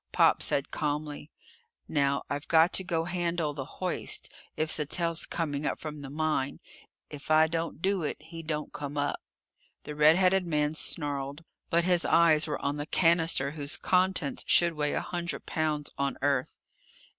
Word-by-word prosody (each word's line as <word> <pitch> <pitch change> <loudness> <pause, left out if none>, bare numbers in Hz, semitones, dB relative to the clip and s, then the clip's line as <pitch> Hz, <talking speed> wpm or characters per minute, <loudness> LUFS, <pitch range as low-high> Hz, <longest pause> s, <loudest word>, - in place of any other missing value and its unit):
Pop - - +4
said 140 - 0
calmly: 150 0 -3 0.6
"Now 140 -2 +1
I've 145 +1 -4
got 165 +2 +4
to 190 - +2
go 165 -2 -1
handle 170 -3 -1
the 140 -2 -5
hoist, 185 -1 -2 0.3
if 155 0 0
Sattell's 165 +2 0
coming 150 -4 -2
up - - -1
from 150 -2 -7
the 135 - -7
mine. 150 -2 -1 0.5
If 145 0 -9
I 155 0 +6
don't 165 0 -3
do 195 -1 +1
it, 150 - -2
he 165 +2 -9
don't 155 -2 -4
come 145 0 -5
up." 145 0 -1 0.6
The 150 - -6
red 150 +2 +6
headed 185 0 +3
man 150 -2 +1
snarled. 145 -1 -1 0.3
But 170 +1 +3
his 180 -1 +2
eyes 160 -2 +4
were 150 - -3
on 140 +1 0
the 145 +1 -4
cannister 165 -5 +2
whose 145 -1 -1
contents 185 -5 +1
should 170 -1 +5
weigh 150 -2 -1
a - - 0
hundred 175 -1 -4
pounds 155 -2 -1
on 140 0 -1
Earth. 140 -2 0
155 Hz, 170 wpm, -29 LUFS, 145-170 Hz, 0.6 s, I